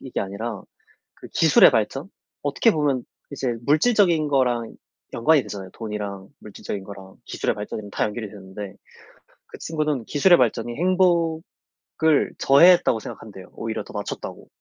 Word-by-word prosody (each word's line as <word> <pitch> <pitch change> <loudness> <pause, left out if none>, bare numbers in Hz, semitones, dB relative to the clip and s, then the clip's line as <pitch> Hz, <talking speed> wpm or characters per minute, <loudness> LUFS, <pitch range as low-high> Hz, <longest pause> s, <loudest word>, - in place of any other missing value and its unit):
이게 130 - -4
아니라 100 +2 -5 0.5
그 - - -13
기술의 - - +6
발전? - - -1 0.3
어떻게 145 +11 +2
보면 145 -6 0 0.3
이제 130 -4 -2
물질적인 165 0 +3
거랑 125 -5 0 0.4
연관이 150 +4 +3
되잖아요. 100 -3 -8
돈이랑 105 -3 -6
물질적인 100 -1 -7
거랑 95 -1 -12
기술의 - - -2
발전이랑 105 0 -7
다 - - -1
연결이 105 +1 -4
되는데 95 0 -9 0.7
그 - - -12
친구는 150 -7 -2
기술의 175 +5 +4
발전이 120 -1 0
행복을 175 -1 +1 0.8
저해했다고 170 -3 +5
생각한대요, 100 -4 -10
오히려 110 -1 -4
더 - - -14
낮췄다고. 100 -1 -6
120 Hz, 350 characters per minute, -23 LUFS, 105-155 Hz, 0.8 s, 기술의